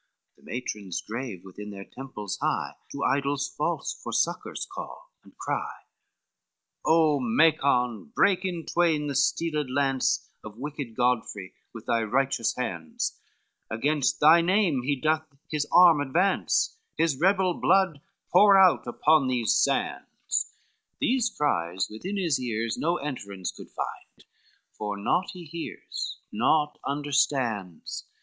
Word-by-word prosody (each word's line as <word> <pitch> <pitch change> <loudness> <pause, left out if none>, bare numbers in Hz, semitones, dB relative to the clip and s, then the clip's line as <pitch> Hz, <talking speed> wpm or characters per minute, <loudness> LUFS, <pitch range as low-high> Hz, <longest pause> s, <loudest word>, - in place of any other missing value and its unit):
The - - -27
matrons 105 -6 -5
grave 115 -5 -6
within 105 +2 -9
their 100 -1 -8
temples 120 -7 -7
high - - 0 0.2
To 140 - -4
idols 140 +1 +1
false - - -1
for - - -8
succors - - -1
call - - -9
and - - -20
cry, - - -3
XXX - - -54
"O 160 -3 +4
Macon, 125 -2 +2
break 195 -2 +3
in 175 -4 -3
twain 165 -4 +1
the 145 - -2
steeled 150 +2 0
lance 135 0 +1 0.2
On 110 +1 -10
wicked 140 -4 -6
Godfrey 120 -6 -1 0.2
with 115 -2 -10
thy 115 -1 +1
righteous 125 +1 0
hands, 85 -10 -3 0.5
Against 140 +5 0
thy 160 +3 +7
name 180 -6 +2
he 140 +3 0
doth 155 +3 0 0.2
his 150 -1 -1
arm 175 -4 +7
advance, 180 - +1 0.2
His 160 -5 +1
rebel 190 +1 +3
blood 180 -5 +2 0.3
pour 200 +2 +7
out 185 -8 +5
upon 150 +3 +3
these 125 -3 +1
sands;" - - -1 0.5
These 250 -2 +2
cries 95 - -1
within 185 - -5
his 170 -7 +1
ears 115 -2 -2
no 170 +2 0
enterance 100 - -5
Could - - -12
find, - - -7 0.5
for 105 -1 -4
naught 175 - 0
he 180 -2 -9
hears, 165 +2 -6
naught 150 +7 +1
understands. 130 - -1
140 Hz, 130 wpm, -27 LUFS, 115-165 Hz, 0.5 s, thy